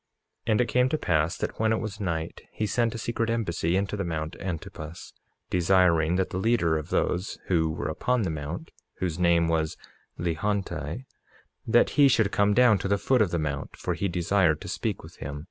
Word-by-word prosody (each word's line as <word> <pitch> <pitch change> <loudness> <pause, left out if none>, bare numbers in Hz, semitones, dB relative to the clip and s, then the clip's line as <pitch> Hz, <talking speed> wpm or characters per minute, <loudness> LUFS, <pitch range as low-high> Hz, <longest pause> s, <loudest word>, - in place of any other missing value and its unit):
47:10 - - +2
And 110 - +4
it 120 - +1
came 125 +3 +2
to 155 - 0
pass 85 - +1
that - - -4
when 110 0 +2
it 110 - +1
was 105 -1 -5
night 85 -5 -3
he 110 - -2
sent 115 +1 0
a - - -3
secret 115 +1 -2
embassy 90 -7 0
into 100 +2 0
the 100 - -2
mount 80 -1 -3
Antipas, 85 -3 -6 0.4
desiring 90 -2 +3
that 95 0 0
the 95 - -2
leader 95 -7 +2
of 75 -1 -3
those 90 +3 -1
who 80 -3 +2
were 80 - -4
upon 125 +9 0
the 90 - -1
mount, 80 +2 -5 0.2
whose 90 -2 -3
name 85 -1 +4
was 80 -1 0 0.4
Lehonti, 85 - -2 0.6
that 120 +1 +4
he 140 - +9
should 110 -6 +3
come 100 0 +2
down 120 -5 +5
to - - -2
the 100 +1 +2
foot 125 +4 +2
of 105 - +3
the 85 - -1
mount, 70 -3 -3
for - - -2
he 100 - -1
desired 85 -2 +2
to - - -7
speak 95 +3 -3
with 80 +3 -13
him. 70 +1 -6
90 Hz, 205 wpm, -27 LUFS, 80-110 Hz, 0.6 s, he